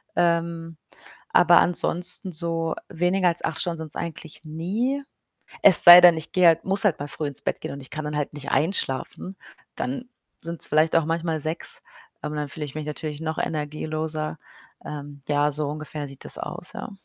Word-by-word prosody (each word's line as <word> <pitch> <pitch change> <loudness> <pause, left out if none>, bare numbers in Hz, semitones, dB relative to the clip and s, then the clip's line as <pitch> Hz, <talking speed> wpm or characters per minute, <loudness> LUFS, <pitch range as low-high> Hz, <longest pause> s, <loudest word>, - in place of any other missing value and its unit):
Ähm, 170 -1 0 0.5
aber - - +6
ansonsten 180 +2 +2
so 165 0 -1
weniger 180 +2 +1
als 170 - -2
8 165 - -3
Stunden 170 -2 -2
sind's 160 -2 -7
eigentlich 160 -2 -7
nie. 210 - -2 0.6
Es 185 -5 +8
sei 175 +1 +12
denn, 175 -2 +8
ich 160 - -5
gehe 180 -1 +5
halt 165 0 +3
muss 195 +1 +2
halt 190 -6 +3
mal 145 - -4
früh 150 +1 -3
ins 145 - -5
Bett - - -2
gehen - - -5
und 140 - -8
ich 130 - -9
kann 155 -1 -5
dann 150 0 -3
halt 145 - -3
nicht 145 -2 -6
einschlafen. 160 +3 -1 0.4
Dann 255 -1 -3 0.4
sind's 170 0 -6
vielleicht 155 +2 +2
auch 165 - +4
manchmal 165 0 -1
6, 170 - -4 0.4
aber 150 - -5
dann 150 - -2
fühle 150 +1 -5
ich 135 - -9
mich 155 -1 -4
natürlich 150 0 -5
noch 160 0 -3
energieloser. 155 0 -3 0.5
Ähm, 145 -1 -8
ja, 145 0 +2
so 150 0 -2
ungefähr 150 -1 -6
sieht 135 0 -10
das - - -4
aus, - - -7
ja. - - -7
160 Hz, 185 wpm, -24 LUFS, 150-175 Hz, 0.6 s, sei